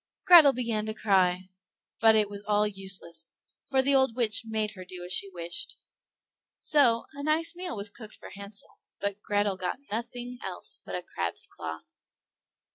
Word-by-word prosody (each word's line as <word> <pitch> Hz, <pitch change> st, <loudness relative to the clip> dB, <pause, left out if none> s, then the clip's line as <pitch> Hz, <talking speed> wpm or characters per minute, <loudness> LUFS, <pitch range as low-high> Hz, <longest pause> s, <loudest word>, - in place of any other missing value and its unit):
Grethel 335 Hz, -6 st, +9 dB
began 230 Hz, -4 st, -2 dB
to 215 Hz, -, -4 dB
cry, 185 Hz, -3 st, +1 dB, 0.5 s
but 225 Hz, -1 st, +6 dB
it 215 Hz, -1 st, +3 dB
was 200 Hz, 0 st, -8 dB
all 210 Hz, 0 st, +3 dB
useless, 190 Hz, -5 st, +1 dB, 0.4 s
for 265 Hz, -1 st, +3 dB
the 280 Hz, +1 st, +3 dB
old 265 Hz, -4 st, +3 dB
witch 225 Hz, -3 st, +2 dB
made 215 Hz, -1 st, -1 dB
her 185 Hz, -3 st, -10 dB
do 180 Hz, -1 st, -9 dB
as 180 Hz, -, -4 dB
she 195 Hz, +2 st, 0 dB
wished. 175 Hz, 0 st, -4 dB, 0.8 s
So 245 Hz, -6 st, +3 dB
a 285 Hz, -, -8 dB
nice 320 Hz, +3 st, 0 dB
meal 355 Hz, -3 st, -5 dB
was 200 Hz, 0 st, -3 dB
cooked 215 Hz, -1 st, -11 dB
for -, -, -12 dB
Hansel, 200 Hz, +1 st, -10 dB, 0.2 s
but 200 Hz, 0 st, -3 dB
Grethel 205 Hz, -2 st, 0 dB
got 185 Hz, +4 st, -3 dB
nothing 245 Hz, +2 st, -5 dB
else 185 Hz, -2 st, -6 dB
but -, -, -6 dB
a 180 Hz, -, -4 dB
crab's 85 Hz, -, -4 dB
claw. 80 Hz, 0 st, -7 dB
210 Hz, 170 wpm, -28 LUFS, 190-245 Hz, 0.8 s, Grethel